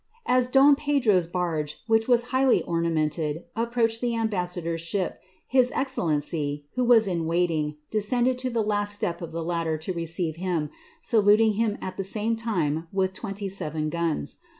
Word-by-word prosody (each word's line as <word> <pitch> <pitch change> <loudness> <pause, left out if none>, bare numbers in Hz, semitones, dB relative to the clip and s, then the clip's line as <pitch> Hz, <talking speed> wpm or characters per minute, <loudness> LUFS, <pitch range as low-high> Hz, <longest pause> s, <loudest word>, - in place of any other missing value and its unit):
As 250 0 +2
Pedro^s 270 - +4
barge, 160 -5 -2
which 225 0 +2
was 240 -1 +4
highly 260 -1 +3
ornamented, 160 -2 -1
approached 230 0 0
the 240 -1 0
am 225 -1 0
idor^s 175 -3 -2
ship, 175 +2 -3 0.2
his 255 -1 +3
excellency, 150 - -1
who 250 - 0
was 235 -2 +5
in 170 -4 -1
waiting, 165 -3 0 0.2
descended 245 +4 +1
to 255 0 -1
the 210 -3 0
step 205 -4 -3
of 165 -1 -6
the 165 0 -4
ladder 165 -2 -1
to 160 +4 -4
receive 165 -1 -3
him, 170 -5 -2 0.3
saluting 215 0 +4
him 215 0 0
at 185 - -5
the 195 - -2
same 215 +4 0
time 170 -9 -1 0.3
twenty 200 0 -5
seven 155 -5 -3
guns. 165 - -2
185 Hz, 150 wpm, -26 LUFS, 165-230 Hz, 0.3 s, was